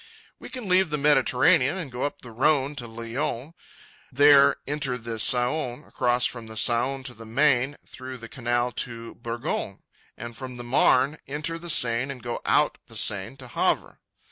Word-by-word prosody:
We - - -10
can 250 -5 -7
leave 185 -1 +3
the 150 - -1
Mediterranean 145 +2 +3
and 160 -8 -6
go 125 +1 -6
up 145 - -6
the 120 -2 -10
Rhône 140 +2 +1
to 120 -4 -4
Lyons, 120 +5 -5 0.6
there 140 +1 +6
enter 140 -3 -2
the 115 -1 -6
Saône, 125 +2 +2
cross 120 0 +1
from 120 -2 -4
the 110 - -9
Saône 130 +4 +1
to 125 - -5
the 115 -1 -13
Maine 135 +2 +1
through 130 0 -9
the 115 -1 -10
Canal 120 0 -1
de 115 -1 -6
Bourgogne, 115 -4 -5 0.3
and 120 +1 -8
from 130 0 -8
the 120 - -7
Marne 135 +3 +2
enter 150 +4 -4
the 175 +1 -7
Seine 125 -2 +3
and 125 -3 -14
go 120 -1 -4
out - - +2
the - - -8
Seine 100 +5 +1
at 125 -2 -11
Havre. - - -1
125 Hz, 175 wpm, -25 LUFS, 120-145 Hz, 0.6 s, there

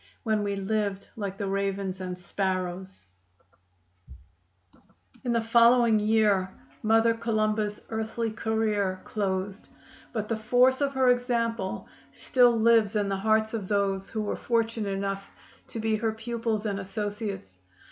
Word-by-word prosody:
When 220 -3 +1
we 200 -1 -1
lived 200 0 -2
like 200 -3 -4
the 200 - -3
ravens 195 -1 -2
and 180 -1 -4
sparrows, 185 - -3 2.2
In 245 - -1
the 230 -1 +1
following 235 -1 +5
year 210 -3 +3 0.3
Mother 225 +1 +4
Columba's 215 -2 -1
earthly 220 +1 -2
career 215 -4 -1
closed, 195 -1 -3 0.4
but 215 -2 -3
the 225 - -1
force 250 +4 +3
of 275 -1 0
her 260 -1 +4
example 230 -5 -1 0.3
still 245 -3 +3
lives 225 -2 +4
in 205 -1 +1
the 195 - 0
hearts 220 +2 +2
of 210 -4 -3
those 195 -1 0
who 215 -1 -2
were 205 - -2
fortunate 230 -3 -1
enough 195 0 -3 0.4
to 230 - -6
be 220 0 +1
her 220 0 -1
pupils 225 -1 -3
and 200 -2 -1
associates. 200 - -5
215 Hz, 135 wpm, -27 LUFS, 195-225 Hz, 2.2 s, following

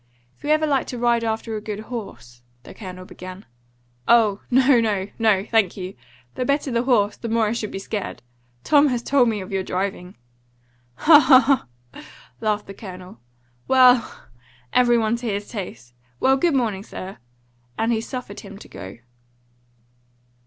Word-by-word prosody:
"If - - -29
you 290 - -4
ever 310 0 +3
like 280 -3 0
to 250 - -5
ride 235 -1 +2
after 225 0 -3
a 210 - -4
good 210 0 -5
horse 200 - -9
" 120 0 -39
the - - -12
Colonel 185 -3 -9
began. 185 +2 -10 0.6
"Oh, 215 -4 +4
no, 260 0 +5
no, 205 -3 -1
no; 210 -4 +3
thank 220 -5 +1
you! 185 0 -6 0.4
The 255 - -3
better 280 +1 0
the 235 0 +1
horse, 215 -5 +2
the 230 - -6
more 225 0 +2
I 210 - 0
should 225 -2 -3
be - - -6
scared. 200 - -5 0.4
Tom 295 -1 +5
has 245 -3 -1
told 260 -3 +3
me 215 -3 -2
of 185 - -9
your 195 -1 0
driving!" 185 -1 -4 0.8
"Ha, 300 - +7
ha, 260 -2 +7 0.5
ha!" - - -11 0.4
laughed 210 -1 -1
the 195 - -9
Colonel. 185 - -11 0.5
"Well! 255 -3 +4 0.5
every 240 -1 +4
one 225 0 +1
to 240 0 -6
his 205 -1 -3
taste. 180 - -8 0.3
Well, 265 0 +4
good 320 +2 +1
morning, 220 -7 0
sir!" 195 -2 -9 0.6
and 225 +1 0
he 225 -1 0
suffered 245 -4 -7
him 200 -1 -11
to - - -13
go. 95 +3 -10
220 Hz, 175 wpm, -22 LUFS, 195-245 Hz, 0.8 s, Ha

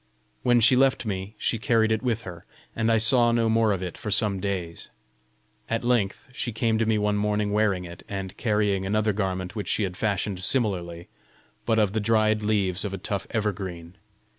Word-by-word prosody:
When 120 -1 +3
she 115 +3 +6
left 135 -1 +2
me, 100 0 -4
she 115 - -1
carried 115 -3 +2
it 110 - +1
with 120 -3 -1
her, 85 -3 -9 0.3
and 110 0 +1
I 115 - +4
saw 120 +2 +4
no 115 -1 +2
more 110 -1 +3
of 95 -2 -2
it 90 - -6
for 110 - -5
some 100 -1 +3
days. 90 -4 -4 0.8
At 115 +1 -1
length 120 -5 0
she 120 - -3
came 115 0 0
to 115 - +1
me 110 -1 +2
one 105 0 +1
morning 105 0 0
wearing 100 -4 +1
it, 85 0 -10
and 95 -2 -5
carrying 105 -4 0
another 105 +2 +1
garment 95 -1 -3
which 105 -4 -4
she 110 - 0
had 90 -2 -3
fashioned 100 -2 -1
similarly, 90 -8 0 0.6
but 115 -1 +2
of 105 -3 +2
the 110 - 0
dried 110 0 +2
leaves 100 -4 0
of 100 -2 -3
a - - -6
tough 100 +1 -4
evergreen. 95 -5 -4
105 Hz, 195 wpm, -25 LUFS, 95-110 Hz, 0.8 s, she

